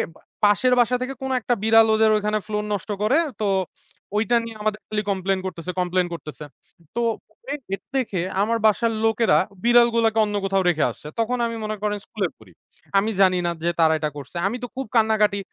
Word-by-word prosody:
বা - - -19 0.2
পাশের 205 +5 +4
বাসা 245 +1 +3
থেকে 255 +2 -3
কোন 265 0 -3
একটা 245 +1 0
বিড়াল 225 0 +6
ওদের 220 0 +4
ওইখানে 210 0 0
floor 210 -1 -2
নষ্ট 205 +1 -4
করে। 260 +8 +3 0.2
তো 210 - -1 0.7
ওইটা 225 +3 +2
নিয়ে 230 -1 -8
আমাদের 210 0 -1
খালি 215 -1 -1
complain 190 0 0
করতেছে, 180 -1 -5
complain 180 0 +1
করতেছে। 150 -2 -8 0.5
তো - - -1 0.3
পরে 280 - -8 0.2
এটা 195 - -6
দেখে 225 -8 -1 0.2
আমার 230 +3 +1
বাসার 225 +2 +3
লোকেরা 225 +1 +3 0.3
বিড়ালগুলোকে 235 -2 +4
অন্য 210 0 -3
কোথাও 195 -1 +1
রেখে 155 -3 +1
আসছে। - - -12
তখন 235 +2 0
আমি 230 - -3
মনে 215 0 -2
করেন 210 0 0
স্কুলে 200 -4 -2
পড়ি। 110 -5 -18 0.5
আমি 200 +3 +2
জানি 185 -1 +5
না 170 - +1
যে 170 - +2
তারা 160 -1 +5
এটা 150 - -1
করছে। 140 +4 -10
আমি 215 - -2
তো - - -2
খুব 265 +1 -3
কান্নাকাটি, 215 -2 +3
215 Hz, 195 wpm, -23 LUFS, 190-230 Hz, 0.7 s, বিড়াল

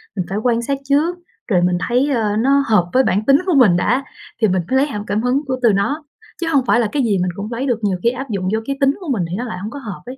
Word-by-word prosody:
mình 185 -3 -2
phải 195 - -2
quan 235 +1 +1
sát 275 +3 -2
trước 300 +6 +1 0.3
rồi 180 -6 +2
mình 180 0 +2
thấy, 255 +4 +1
ơ, 220 -6 0
nó 275 +4 +3
hợp 195 -6 +2
với 260 - +4
bản 210 -3 0
tính 275 0 +6
của 365 - +1
mình 210 -10 +5
đã, 250 +9 +1 0.4
thì 220 - +5
mình 185 -1 +1
phải 260 - +1
lấy 275 - +3
cảm 210 -8 -5
cảm 205 +3 0
hứng 250 +3 +1
của 260 - 0
từ 230 -4 +4
nó, 285 +11 -1 0.4
chứ 335 - -1
hông 270 -3 +3
phải 240 - +4
là 230 - +2
cái 285 -2 0
gì 210 -5 +1
mình 180 0 -1
cũng 210 +3 -6
lấy 240 +3 -3
được, 240 -3 0
nhiều 190 -3 0
khi 235 - +4
áp 260 +2 -6
dụng 190 -3 -2
vô 220 - +1
cái 275 +2 -3
tính 275 - +5
của 350 -6 -7
mình 195 -8 0
thì 180 - -3
nó 240 - -3
lại 185 -6 -5
hông 205 +4 -5
có 285 - -7
hợp 215 -8 -8
ấy. 255 +2 -8
235 Hz, 315 wpm, -18 LUFS, 200-275 Hz, 0.4 s, tính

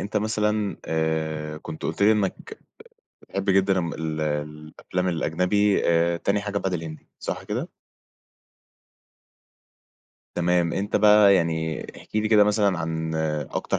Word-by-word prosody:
أنت 100 +2 -4
مثلًا 105 -1 0
آآ 80 -1 -2
كنت 80 - -9
قُلت 80 +5 -2
لي 105 +2 +6
إنّك 100 -3 -3 0.6
بتحب 100 +1 -4
جدًا 95 0 +3
ال 80 -2 -3
الأفلام 75 +4 -3
الأجنبي 90 +5 +1
آآ 85 0 +2
تاني 100 +4 0
حاجة 100 0 -3
بعد 95 -2 -2
الهندي، 80 -2 -6
صح - - -4
كده؟ - - -4 2.7
تمام. 85 -1 +1
أنت 100 +2 -1
بقى 105 -1 +6
يعني 80 -2 0 0.2
احكِ - - -14
لي 110 0 +1
كده 105 -2 +6
مثلًا 105 -3 +2
عن 80 -1 -3 0.4
أكتر - - -2
90 Hz, 125 wpm, -24 LUFS, 80-100 Hz, 2.7 s, لي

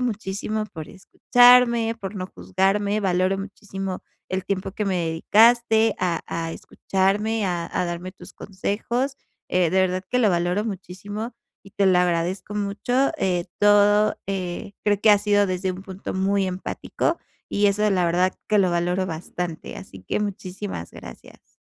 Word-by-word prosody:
muchísimo 215 -2 -2
por 160 -7 -9
escucharme, 235 +3 +4
por 195 +1 -5
no 185 -1 -4
juzgarme, 200 +3 0
valoro 185 0 +1
muchísimo 195 -1 -6 0.3
el 185 0 -2
tiempo 195 -1 -2
que 210 - -3
me 190 - 0
dedicaste 220 +6 +4
a 180 -2 0
a 165 0 -3
escucharme, 205 +6 -1
a 175 -2 -2
a - - 0
darme 175 +2 -5
tus - - -12
consejos. 235 +7 -3 0.3
Eh, 180 -2 +2
de 190 - +3
verdad 185 0 0
que 250 - +2
lo 220 -5 +4
valoro 175 +4 0
muchísimo 205 +3 -6 0.3
y 195 - -15
te 200 - +1
lo 180 -1 +5
agradezco 180 +3 -1
mucho, 210 +6 0
eh, 180 -6 0
todo, 205 +1 +4
eh, 190 -1 -4
creo 205 -1 +2
que 215 - +6
ha 205 - +6
sido 205 0 +2
desde 185 0 -2
un 185 +1 -9
punto 190 0 -7
muy 195 +1 +1
empático, 185 0 -2 0.3
y 205 0 +3
eso 210 +1 +2
la 185 -2 +2
verdad 180 +2 +2 0.2
que 210 - +3
lo 185 -2 +3
valoro 175 +2 0
bastante, 170 0 -5
así 190 - -11
que, - - -1
muchísimas 190 - -5
gracias. - - -13
195 Hz, 160 wpm, -23 LUFS, 180-210 Hz, 0.3 s, que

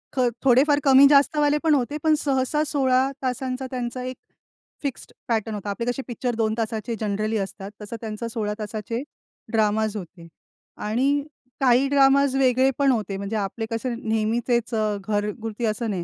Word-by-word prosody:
ख, - - -1 0.2
थोडेफार 275 +3 +4
कमी 270 0 +7
जास्तवाले 290 +1 +4
पण 320 -2 +4
होते. 280 +2 -1
पण 315 -1 +4
सहसा 275 +1 0
16 265 -2 +2
तासांचा 255 +1 -2
त्यांचा 250 0 -4
एक 255 0 -5 0.7
फिक्स्ड 280 -3 -5 0.2
पॅटर्न 220 -2 -1
होता. 205 0 -5
आपले 215 +4 -3
कसे 260 - -4
पिक्चर 245 0 -3
2 220 -1 0
तासाचे 225 0 -2
जनरली 215 +1 -1
असतात, 195 0 -5
तसं 210 +3 -6
त्यांचा 220 +1 -5
16 220 -3 -2
तासाचे 215 +2 -4 0.5
ड्रामाझ 220 -1 +1
होते. 175 -3 -10 0.5
आणि 270 +7 +1 0.4
काही 255 +1 +4
ड्रामाझ 275 -1 +4
वेगळे 260 0 +3
पण 280 -1 +4
होते. 210 -5 -2
म्हणजे 200 +2 -4
आपले 210 +2 -3
कसं 235 +2 -2
नेहमीचेच 230 +2 0
अ, 215 -1 0
घरगुती 210 +2 -2
असं 220 +1 -1
नाही. 185 -4 -2
235 Hz, 155 wpm, -24 LUFS, 215-265 Hz, 0.7 s, कमी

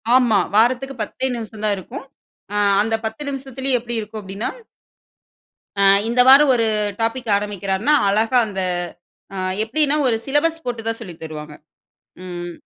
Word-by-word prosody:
ஆமா. 240 -5 +4 0.2
வாரத்துக்கு 255 +4 +2
10தே 260 +5 -3
நிமிஷம் 220 -2 -8
தான் 205 - +2
இருக்கும். 260 - -8 0.5
ஆ - - -3 0.3
அந்த 225 +1 0
10 220 +5 -5
நிமிஷத்திலயும் 265 -1 -2
எப்டி 240 0 -6
இருக்கும்? 215 0 -7
அப்டின்னா 195 +3 -4 1.3
ஆ. - - +4 0.2
இந்த 245 +2 +3
வாரம் 275 0 +8
ஒரு 230 -1 +1 0.4
டாபிக் 230 +1 -2
ஆரம்பிக்கிறார்ன்னா 205 +5 -1
அழகா 220 +5 +2
அந்த 195 -2 -4 0.7
ஆ - - -5 0.3
எப்டின்னா 290 +5 +2
ஒரு 230 - +2
சிலபஸ் 325 +4 0
போட்டு 240 -2 -3
தான் 225 - -1
சொல்லி 185 -7 -8
தருவாங்க. 155 -1 -8 0.7
ம். 175 -1 -6
225 Hz, 140 wpm, -20 LUFS, 205-265 Hz, 1.3 s, வாரம்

